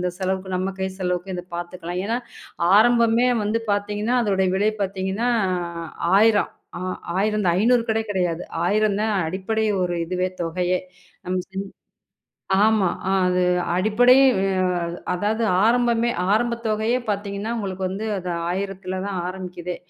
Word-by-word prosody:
இந்தச் 180 Hz, 0 st, -3 dB
செலவுக்கு 190 Hz, 0 st, -2 dB
நம்ம 190 Hz, +1 st, -2 dB
கை 190 Hz, -, 0 dB
செலவுக்கு 180 Hz, +1 st, -2 dB
இதைப் 180 Hz, 0 st, -9 dB
பாத்துக்கலாம். 175 Hz, 0 st, -5 dB
ஏன்னா, 230 Hz, +2 st, 0 dB, 0.6 s
ஆரம்பமே 235 Hz, +2 st, +4 dB, 0.2 s
வந்து 215 Hz, +2 st, 0 dB
பாத்தீங்கன்னா, 210 Hz, +4 st, -1 dB
அதோட 190 Hz, -2 st, +1 dB
விலை 210 Hz, +2 st, +2 dB
பாத்தீங்கன்னா, 195 Hz, +4 st, -1 dB, 0.9 s
1000 210 Hz, -2 st, +4 dB, 0.3 s
ஆ -, -, -7 dB, 0.4 s
ஆயிரந்தான். 205 Hz, -4 st, +1 dB
500 240 Hz, +2 st, +4 dB
கூட 220 Hz, 0 st, +1 dB
கிடையாது. 175 Hz, -3 st, -1 dB, 0.2 s
1000 210 Hz, +1 st, +2 dB
தான் 215 Hz, -1 st, 0 dB
அடிப்படை 195 Hz, +6 st, -1 dB, 0.2 s
ஒரு 175 Hz, -1 st, -1 dB
இதுவே, 185 Hz, +1 st, -1 dB
தொகையே. 180 Hz, +2 st, 0 dB, 0.5 s
நம்ம 185 Hz, +1 st, -1 dB
செஞ் 190 Hz, +1 st, -4 dB, 1.0 s
ஆமா. 215 Hz, -3 st, +3 dB, 0.4 s
அது 180 Hz, 0 st, +2 dB, 0.3 s
அடிப்படை. 220 Hz, +7 st, +5 dB, 0.2 s
அ 190 Hz, -1 st, +1 dB, 0.5 s
அதாவது 210 Hz, +5 st, -1 dB, 0.2 s
ஆரம்பமே 235 Hz, 0 st, +3 dB, 0.2 s
ஆரம்பத் 235 Hz, +1 st, 0 dB
தொகையயே 220 Hz, +3 st, +1 dB
பாத்தீங்கன்னா, 200 Hz, +1 st, -3 dB
உங்களுக்கு 190 Hz, -3 st, -4 dB
வந்து 195 Hz, +4 st, -4 dB
அது 180 Hz, -1 st, -5 dB, 0.2 s
1000த்துல 190 Hz, 0 st, -4 dB
தான் 200 Hz, -2 st, -3 dB
ஆரம்பிக்குதே. 180 Hz, -1 st, -6 dB
195 Hz, 130 wpm, -23 LUFS, 185-220 Hz, 1.0 s, அடிப்படை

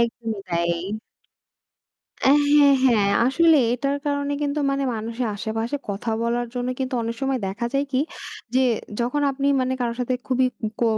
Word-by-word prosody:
একদমই 230 Hz, -2 st, -2 dB
তাই। 170 Hz, 0 st, +1 dB, 1.5 s
হ্যাঁ, 285 Hz, 0 st, +5 dB
হ্যাঁ 215 Hz, -6 st, +4 dB, 0.2 s
আসলে 320 Hz, +4 st, +5 dB, 0.2 s
এটার 275 Hz, +3 st, -1 dB
কারণে 285 Hz, 0 st, 0 dB
কিন্তু 285 Hz, +1 st, -1 dB
মানে 275 Hz, 0 st, 0 dB
মানুষের 230 Hz, +3 st, -3 dB
আশেপাশে 225 Hz, +5 st, -2 dB
কথা 200 Hz, +3 st, -3 dB
বলার 240 Hz, +1 st, 0 dB
জন্য 245 Hz, 0 st, -2 dB
কিন্তু 260 Hz, 0 st, -2 dB
অনেক 230 Hz, 0 st, -3 dB
সময় 270 Hz, -1 st, +1 dB
দেখা 200 Hz, +5 st, -3 dB
যায় 275 Hz, +1 st, +2 dB
কি 260 Hz, -, +2 dB, 0.5 s
যে 260 Hz, -, +4 dB, 0.4 s
যখন 250 Hz, +5 st, 0 dB
আপনি 275 Hz, +1 st, -2 dB
মানে 255 Hz, 0 st, 0 dB
কারো 235 Hz, -1 st, -1 dB
সাথে 250 Hz, +1 st, 0 dB
খুবই 255 Hz, 0 st, +2 dB, 0.4 s
অ -, -, +5 dB
255 Hz, 155 wpm, -23 LUFS, 230-275 Hz, 1.5 s, হ্যাঁ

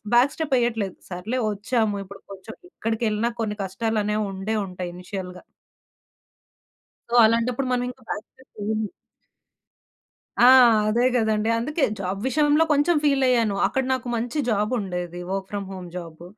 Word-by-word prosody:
Back 250 Hz, +4 st, +4 dB
step 315 Hz, -4 st, -1 dB
వెయ్యట్లేదు. 225 Hz, -5 st, -1 dB
సర్లే 200 Hz, +8 st, -3 dB
వచ్చాము 210 Hz, 0 st, 0 dB
ఇప్పుడు 195 Hz, +1 st, -12 dB
కొంచెం 195 Hz, +3 st, -10 dB, 0.2 s
ఎక్కడికెళ్ళిన 225 Hz, -, -1 dB
కొన్ని 215 Hz, -2 st, -1 dB
కష్టాలనేవి 210 Hz, +1 st, -1 dB
ఉండే 195 Hz, +3 st, -3 dB
ఉంటాయి 180 Hz, -1 st, -6 dB
ఇనీషియల్‌గా. 180 Hz, 0 st, -7 dB, 1.7 s
సో, 235 Hz, -, -3 dB
అలాంటప్పుడు 235 Hz, +3 st, 0 dB
మనం 245 Hz, 0 st, +1 dB
ఇంకా 255 Hz, 0 st, -14 dB
బ్యాక్ 210 Hz, -, -4 dB
స్టెప్ 260 Hz, 0 st, -23 dB
వెయ్యము. 215 Hz, 0 st, -2 dB, 1.5 s
ఆ! 245 Hz, -, +9 dB, 0.4 s
అదే 235 Hz, +3 st, +2 dB
గదండీ! 220 Hz, -2 st, +1 dB
అందుకే 300 Hz, +5 st, 0 dB, 0.2 s
జాబ్ 190 Hz, +1 st, -3 dB
విషయంలో 295 Hz, +3 st, +3 dB
కొంచెం 295 Hz, +4 st, +3 dB
ఫీలయ్యాను. 255 Hz, -7 st, +3 dB
అక్కడ 265 Hz, -, -1 dB
నాకు 255 Hz, -1 st, -2 dB
మంచి 240 Hz, +6 st, -3 dB
జాబ్ 210 Hz, +1 st, +1 dB
ఉండేది, 180 Hz, -3 st, -4 dB
వర్క్ 195 Hz, 0 st, -3 dB
ఫ్రామ్ 200 Hz, -1 st, -4 dB
హోమ్ 180 Hz, -2 st, -8 dB
జాబ్. 170 Hz, -2 st, -8 dB
220 Hz, 135 wpm, -24 LUFS, 195-245 Hz, 1.7 s, ఆ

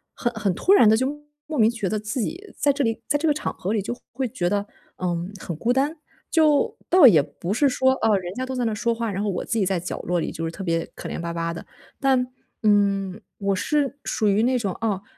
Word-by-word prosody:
很 240 Hz, -1 st, -1 dB
很 215 Hz, -3 st, 0 dB
突 380 Hz, -, +3 dB
然 235 Hz, -, +7 dB
地 220 Hz, -, +5 dB
就 260 Hz, +3 st, +1 dB, 0.4 s
莫 305 Hz, -5 st, -3 dB
名 220 Hz, -, +6 dB
觉 230 Hz, -4 st, -3 dB
得 215 Hz, +3 st, -1 dB
自 215 Hz, +4 st, -4 dB
己 365 Hz, -, -5 dB
在 285 Hz, -, +3 dB
这 280 Hz, +1 st, 0 dB
里 225 Hz, -2 st, 0 dB
在 290 Hz, -, +1 dB
这 320 Hz, -, +1 dB
个 300 Hz, -, +4 dB
场 300 Hz, -, -3 dB
合 195 Hz, +4 st, -3 dB
里 220 Hz, -, +1 dB
就 240 Hz, +5 st, -4 dB, 0.2 s
会 260 Hz, 0 st, -1 dB
觉 180 Hz, -7 st, -1 dB
得， 205 Hz, 0 st, 0 dB, 0.3 s
嗯， 175 Hz, +1 st, -2 dB
很 170 Hz, -, -5 dB
孤 230 Hz, +10 st, 0 dB
单。 280 Hz, +5 st, +1 dB, 0.3 s
就 310 Hz, -3 st, +3 dB
倒 360 Hz, -4 st, +7 dB
也 165 Hz, -, +8 dB
不 155 Hz, +6 st, -5 dB
是 280 Hz, +4 st, +3 dB
说， 260 Hz, +1 st, +3 dB
啊， 220 Hz, -5 st, +2 dB
人 180 Hz, -1 st, -5 dB
家 255 Hz, +5 st, -4 dB
都 260 Hz, 0 st, -4 dB
在 250 Hz, -1 st, 0 dB
那 225 Hz, -, 0 dB
说 235 Hz, +3 st, 0 dB
话， 230 Hz, -2 st, -2 dB
然 195 Hz, 0 st, -3 dB
后 210 Hz, -, 0 dB
我 185 Hz, -, -3 dB
自 -, -, -12 dB
己 190 Hz, -, +1 dB
在 190 Hz, -2 st, 0 dB
角 175 Hz, -, -5 dB
落 175 Hz, 0 st, 0 dB
里 -, -, -2 dB
就 165 Hz, -, -5 dB
是 165 Hz, -, -1 dB
特 180 Hz, +4 st, -7 dB
别 165 Hz, -2 st, 0 dB
可 -, -, -7 dB
怜 -, -, -4 dB
巴 170 Hz, 0 st, -3 dB
巴 165 Hz, 0 st, -2 dB
的。 165 Hz, -, -7 dB, 0.4 s
但， 265 Hz, -2 st, +3 dB, 0.4 s
嗯， 200 Hz, -1 st, +2 dB, 0.2 s
我 200 Hz, -1 st, 0 dB
是 285 Hz, +6 st, 0 dB
属 215 Hz, -, 0 dB
于 205 Hz, +1 st, +3 dB
那 250 Hz, +2 st, +2 dB
种 200 Hz, -6 st, -2 dB
啊， 205 Hz, -4 st, -1 dB
215 Hz, 275 characters per minute, -24 LUFS, 190-260 Hz, 0.4 s, 也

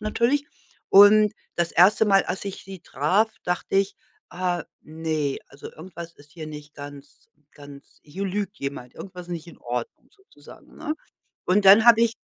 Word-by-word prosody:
natürlich. 235 Hz, +7 st, 0 dB, 0.4 s
Und 205 Hz, +1 st, +7 dB, 0.2 s
das 170 Hz, -1 st, -1 dB
1. 195 Hz, +5 st, +5 dB
Mal, 195 Hz, -1 st, +4 dB
als 185 Hz, +2 st, -4 dB
ich 195 Hz, -, -6 dB
sie 190 Hz, -1 st, -9 dB
traf, 190 Hz, +11 st, +1 dB
dachte 180 Hz, +2 st, -3 dB
ich: 195 Hz, +1 st, +1 dB, 0.3 s
„Ah, 175 Hz, -1 st, -2 dB, 0.2 s
ne, 155 Hz, -3 st, -3 dB
also 140 Hz, -, -11 dB
irgendwas 170 Hz, 0 st, -10 dB
ist 145 Hz, 0 st, -20 dB
hier 160 Hz, -2 st, -8 dB
nicht 150 Hz, -1 st, -10 dB
ganz 145 Hz, 0 st, -12 dB, 0.2 s
ganz 145 Hz, -1 st, -15 dB
hier 185 Hz, +7 st, -6 dB
lügt 200 Hz, +2 st, -3 dB
jemand, 140 Hz, -3 st, -6 dB
irgendwas 180 Hz, -2 st, -9 dB
ist -, -, -5 dB
nicht 170 Hz, 0 st, -7 dB
in 170 Hz, -, -14 dB
Ordnung“, 120 Hz, 0 st, -6 dB
sozusagen, 390 Hz, -1 st, -18 dB
ne? 310 Hz, -1 st, -4 dB, 0.5 s
Und 195 Hz, +2 st, +2 dB
dann 205 Hz, +3 st, +8 dB
habe 230 Hz, -1 st, +7 dB
ich 230 Hz, 0 st, +1 dB
180 Hz, 165 wpm, -24 LUFS, 150-205 Hz, 0.5 s, dann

